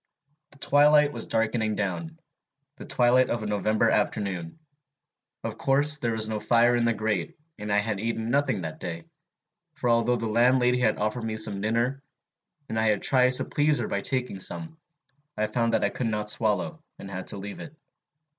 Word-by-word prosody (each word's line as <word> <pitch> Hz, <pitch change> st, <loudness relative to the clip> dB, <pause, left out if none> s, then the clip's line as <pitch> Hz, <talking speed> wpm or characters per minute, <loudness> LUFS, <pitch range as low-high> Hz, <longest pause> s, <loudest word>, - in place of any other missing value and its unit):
The 140 Hz, -, -20 dB
twilight 145 Hz, +1 st, +4 dB
was 115 Hz, -, -6 dB
darkening 110 Hz, -1 st, 0 dB
down, 160 Hz, -, -3 dB, 0.6 s
the -, -, -9 dB
twilight 125 Hz, +1 st, +3 dB
of 120 Hz, -2 st, -2 dB
a -, -, -4 dB
November 110 Hz, +2 st, +1 dB
afternoon. 100 Hz, -, -1 dB, 0.9 s
Of -, -, -5 dB
course 145 Hz, +2 st, +1 dB
there 120 Hz, -4 st, -1 dB
was 110 Hz, -1 st, -2 dB
no 110 Hz, -1 st, -2 dB
fire 120 Hz, +2 st, +3 dB
in 120 Hz, -1 st, +1 dB
the 115 Hz, -, +2 dB
grate, 105 Hz, -5 st, -2 dB, 0.2 s
and 105 Hz, 0 st, -4 dB
I 100 Hz, -, +3 dB
had 105 Hz, -1 st, -1 dB
eaten 115 Hz, +1 st, -2 dB
nothing 140 Hz, -7 st, +1 dB
that 80 Hz, -2 st, -6 dB
day; 85 Hz, -1 st, -5 dB, 0.7 s
for 120 Hz, -, 0 dB
although 115 Hz, +1 st, +2 dB
the 115 Hz, -1 st, -3 dB
landlady 125 Hz, +2 st, +3 dB
had 110 Hz, -4 st, +2 dB
offered 110 Hz, +3 st, -2 dB
me 110 Hz, -1 st, -3 dB
some 105 Hz, -3 st, -2 dB
dinner, 120 Hz, +5 st, 0 dB, 0.7 s
and 110 Hz, -, -2 dB
I 110 Hz, -, +2 dB
had 105 Hz, -2 st, +1 dB
tried 130 Hz, -1 st, +3 dB
to -, -, +4 dB
please 150 Hz, 0 st, +1 dB
her -, -, -2 dB
by 100 Hz, -, -2 dB
taking 125 Hz, -6 st, -2 dB
some, 160 Hz, -, -3 dB, 0.6 s
I 110 Hz, -, +1 dB
found 115 Hz, +1 st, 0 dB
I -, -, +1 dB
could 125 Hz, -, -2 dB
not 105 Hz, -1 st, -2 dB
swallow, 115 Hz, -, -1 dB, 0.2 s
and 100 Hz, -, -9 dB
had 95 Hz, 0 st, -6 dB
to -, -, -1 dB
leave 100 Hz, +1 st, -7 dB
it. 155 Hz, -, -10 dB
115 Hz, 185 wpm, -26 LUFS, 105-125 Hz, 0.9 s, twilight